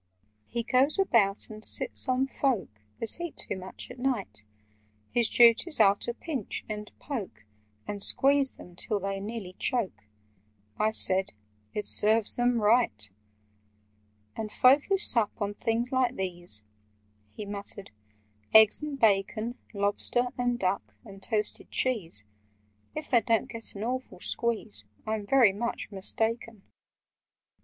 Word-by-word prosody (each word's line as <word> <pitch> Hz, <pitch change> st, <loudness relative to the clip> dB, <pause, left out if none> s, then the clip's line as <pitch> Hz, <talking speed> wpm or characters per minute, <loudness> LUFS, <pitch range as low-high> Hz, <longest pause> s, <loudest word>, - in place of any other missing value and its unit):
"He 235 Hz, 0 st, -3 dB
goes 260 Hz, -, +2 dB
about 225 Hz, -, +2 dB
and 215 Hz, 0 st, -7 dB
sits 285 Hz, -, +3 dB
on 255 Hz, +1 st, +2 dB
folk 235 Hz, -, -2 dB, 0.2 s
That 230 Hz, +9 st, +4 dB
eat 345 Hz, -3 st, -6 dB
too -, -, -3 dB
much 190 Hz, +5 st, -8 dB
at 250 Hz, -, -11 dB
night: 240 Hz, -, -2 dB, 0.7 s
His 235 Hz, -2 st, +2 dB
duties 240 Hz, +7 st, +5 dB
are 200 Hz, -2 st, +6 dB
to 235 Hz, -, -4 dB
pinch, 275 Hz, -, -5 dB
and 210 Hz, -1 st, -6 dB
poke, 225 Hz, -, -6 dB, 0.4 s
And 205 Hz, -1 st, -5 dB
squeeze 275 Hz, +4 st, +2 dB
them 180 Hz, -, -14 dB
till 205 Hz, +3 st, -2 dB
they 195 Hz, 0 st, -3 dB
nearly 205 Hz, -2 st, -6 dB
choke." 190 Hz, -, -2 dB, 0.7 s
(I 215 Hz, -, +3 dB
said 190 Hz, -3 st, +3 dB, 0.4 s
"It 210 Hz, -, -2 dB
serves 215 Hz, +1 st, +4 dB
them 245 Hz, -1 st, +1 dB
right!") 210 Hz, -, +2 dB, 1.2 s
"And 215 Hz, -1 st, -5 dB
folk 270 Hz, +6 st, +5 dB
who 390 Hz, -, +1 dB
sup 230 Hz, -, +4 dB
on 205 Hz, -1 st, -2 dB
things 230 Hz, +3 st, -1 dB
like 260 Hz, -1 st, +1 dB
these—" 175 Hz, -, -2 dB, 0.7 s
He 210 Hz, -, -6 dB
muttered, 200 Hz, -1 st, -6 dB, 0.6 s
"eggs 220 Hz, +3 st, +7 dB
and 295 Hz, -2 st, -5 dB
bacon— 220 Hz, +2 st, +1 dB
Lobster—and 245 Hz, +4 st, -1 dB
duck—and 195 Hz, +1 st, -4 dB
toasted 210 Hz, +1 st, -3 dB
cheese— 190 Hz, -, -1 dB, 0.7 s
If 305 Hz, -2 st, -6 dB
they 240 Hz, -3 st, +5 dB
don't 225 Hz, +1 st, 0 dB
get 225 Hz, -1 st, -8 dB
an 200 Hz, -, -5 dB
awful 255 Hz, -4 st, -4 dB
squeeze, 190 Hz, -, -2 dB, 0.2 s
I'm 215 Hz, -2 st, -3 dB
very 240 Hz, -5 st, +5 dB
much 235 Hz, +3 st, -4 dB
mistaken! 220 Hz, +2 st, -2 dB
220 Hz, 130 wpm, -28 LUFS, 200-245 Hz, 1.2 s, eggs